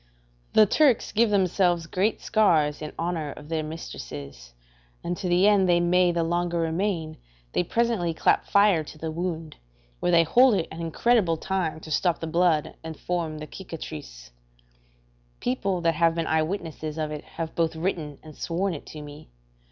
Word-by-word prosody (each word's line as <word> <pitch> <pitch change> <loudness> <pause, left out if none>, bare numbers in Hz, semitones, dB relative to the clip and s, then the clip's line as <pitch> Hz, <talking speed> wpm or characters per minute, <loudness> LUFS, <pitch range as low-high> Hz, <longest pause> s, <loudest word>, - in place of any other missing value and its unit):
The 215 - +7
Turks 270 +3 +3
give 230 +1 +3
themselves 185 -3 +2
great 190 +6 0
scars 160 -10 +2
in 150 - -5
honour 165 -4 -2
of 150 0 -12
their 160 -1 -1
mistresses, 70 - -8 0.5
and 175 - -2
to 180 - -4
the 180 +3 +4
end 200 -3 +4
they 175 0 +5
may 175 +1 +3
the 170 -1 0
longer 175 +1 0
remain, 165 -1 -1 0.4
they - - +2
presently 225 -3 0
clap 160 - +2
fire 200 -5 +4
to 155 - -11
the 160 +1 -4
wound, 165 -2 -4 0.4
where 175 - +1
they 170 -1 +6
hold 245 - +5
it 165 - -1
an 165 +1 -7
incredible 170 +1 +2
time 180 -3 -2
to 155 - -9
stop 175 +2 +1
the - - -4
blood 165 -2 +1
and 160 -1 -7
form 170 -3 -2
the 155 - -6
cicatrice; 75 - -9 1.1
people 195 -8 -1
that 165 -1 +2
have 165 +1 +2
been 165 -1 -1
eyewitnesses 160 -1 -2
of 155 -1 -2
it 150 -1 -6
have 165 -1 -6
both 165 -1 0
written 160 -4 -3
and 155 -2 -12
sworn 180 +3 -1
it 150 - -8
to 150 -1 -8
me. 145 - -11
165 Hz, 175 wpm, -26 LUFS, 155-185 Hz, 1.1 s, The